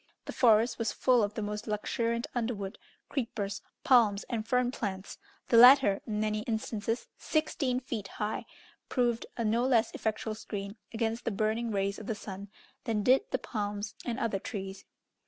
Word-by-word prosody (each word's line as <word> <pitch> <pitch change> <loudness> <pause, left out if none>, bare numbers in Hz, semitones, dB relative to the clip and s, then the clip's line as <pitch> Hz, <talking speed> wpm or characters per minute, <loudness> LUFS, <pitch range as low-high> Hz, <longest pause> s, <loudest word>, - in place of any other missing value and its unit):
The - - -6
forest 230 0 +4
was 230 -2 0
full 250 -2 +3
of 205 0 -1
the 220 - -2
most 210 +1 -4
luxuriant 230 +2 -1
underwood, 225 -5 -3 0.3
creepers, 205 -6 -3 0.2
palms, 220 -6 +5
and 225 -2 -2
fern 250 0 +2
plants; 200 -5 -5 0.3
the 235 - +5
latter, 250 -4 +8
in 210 -1 -2
many 215 0 0
instances 225 0 -2
sixteen 285 -5 0
feet 235 -6 -5
high, 210 +2 -4 0.4
proved 240 -2 +1
a 230 - -1
no 230 +3 +2
less 245 -4 +3
effectual 220 0 -2
screen 200 -1 -6 0.2
against 225 0 -1
the - - 0
burning 220 +2 0
rays 200 -1 -1
of 215 - -9
the 220 - -1
sun 200 -1 -8 0.4
than 220 -4 0
did 270 - +4
the - - 0
palms 205 -2 -4
and 240 0 -3
other 220 -6 0
trees. 195 -2 -6
220 Hz, 165 wpm, -30 LUFS, 205-240 Hz, 0.4 s, latter